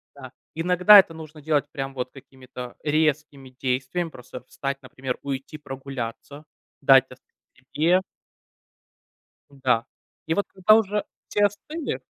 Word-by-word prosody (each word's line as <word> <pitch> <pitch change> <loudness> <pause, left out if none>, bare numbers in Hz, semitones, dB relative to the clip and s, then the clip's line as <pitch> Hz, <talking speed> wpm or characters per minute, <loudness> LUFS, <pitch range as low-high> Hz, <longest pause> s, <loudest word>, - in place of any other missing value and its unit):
да. 130 -2 -10 0.2
Иногда 180 +5 +7
это 170 - +2
нужно 155 -1 -11
делать 150 -1 0
прям 135 -1 -5
вот 125 -1 -4
какими-то 130 -2 -11
резкими 150 -3 0
действиям. 135 +6 -1
Просто 125 +1 -10
встать, 135 0 -4
например, 130 0 -5
уйти 140 +2 -5
прогуляться, 135 0 -7 0.4
дать 135 -1 +6
остыть 125 - -18 0.4
себе. 170 +5 +4 1.6
Да, 120 -3 +3 0.4
и 160 - 0
вот 205 - 0
когда 195 +3 +5
уже 210 -1 +1 0.3
все 205 0 +3
остыли 300 - -3
140 Hz, 125 wpm, -24 LUFS, 130-165 Hz, 1.6 s, Иногда